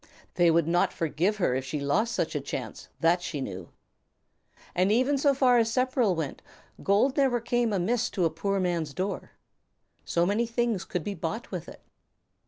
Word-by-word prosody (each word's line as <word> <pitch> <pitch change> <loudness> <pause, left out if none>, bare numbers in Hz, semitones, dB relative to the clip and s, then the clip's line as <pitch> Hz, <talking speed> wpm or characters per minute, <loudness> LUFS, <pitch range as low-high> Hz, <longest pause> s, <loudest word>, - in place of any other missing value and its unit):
They 175 -1 +4
would 165 -1 +3
not 175 +1 +2
forgive 170 +6 0
her 175 -10 +1
if 130 +1 -1
she 135 +3 -4
lost 195 +12 0
such - - -1
a - - -2
chance, - - -6
that 175 +2 +3
she 155 -4 -4
knew. 95 -8 -6 1.0
And 185 +3 +2
even 255 +6 +3
so 280 0 +3
far 250 -2 +4
as 225 -1 +1
Sepperl 255 -5 +2
went, 160 -4 -4 0.4
gold 215 +8 +2
never 265 -3 +3
came 235 0 0
amiss 215 +5 0
to 180 - +3
a 165 - +1
poor 195 +5 -1
man's 170 -6 -1
door. 195 +2 -4 0.7
So 170 0 +1
many 210 +5 +1
things 235 -4 -1
could 180 - -3
be 205 - -3
bought 170 +5 -5
with - - -5
it. - - -13
195 Hz, 185 wpm, -27 LUFS, 165-235 Hz, 1.0 s, They